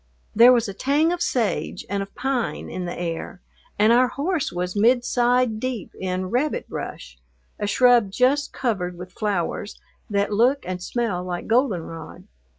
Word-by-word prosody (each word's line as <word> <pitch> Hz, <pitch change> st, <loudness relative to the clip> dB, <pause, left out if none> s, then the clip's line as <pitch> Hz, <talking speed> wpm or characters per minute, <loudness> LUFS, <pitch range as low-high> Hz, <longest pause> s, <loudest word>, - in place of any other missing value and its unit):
There 235 Hz, +3 st, +8 dB
was 240 Hz, -2 st, +3 dB
a 200 Hz, -, -5 dB
tang 285 Hz, -, +2 dB
of 355 Hz, -, -4 dB
sage 240 Hz, -9 st, -1 dB
and 200 Hz, 0 st, -2 dB
of 195 Hz, 0 st, -8 dB
pine 265 Hz, -3 st, -2 dB
in 185 Hz, -, -4 dB
the 175 Hz, -, -5 dB
air, 170 Hz, +1 st, -4 dB, 0.4 s
and 215 Hz, +3 st, +5 dB
our 250 Hz, +1 st, +5 dB
horse 305 Hz, +4 st, -2 dB
was 180 Hz, +1 st, -3 dB
midside 245 Hz, +1 st, +2 dB
deep 250 Hz, -5 st, -4 dB
in 185 Hz, 0 st, -3 dB
rabbit 280 Hz, +5 st, 0 dB
brush, 60 Hz, 0 st, -7 dB, 0.4 s
a 205 Hz, -, -1 dB
shrub 240 Hz, -1 st, +4 dB
just 270 Hz, +6 st, +2 dB
covered 180 Hz, -8 st, -2 dB
with 180 Hz, +1 st, -9 dB
flowers 205 Hz, -1 st, -2 dB, 0.3 s
that 200 Hz, 0 st, 0 dB
look 250 Hz, +7 st, +3 dB
and 180 Hz, -1 st, -4 dB
smell 200 Hz, -3 st, -2 dB
like 180 Hz, -1 st, -4 dB
goldenrod. 180 Hz, -, -1 dB
220 Hz, 155 wpm, -23 LUFS, 185-250 Hz, 0.4 s, There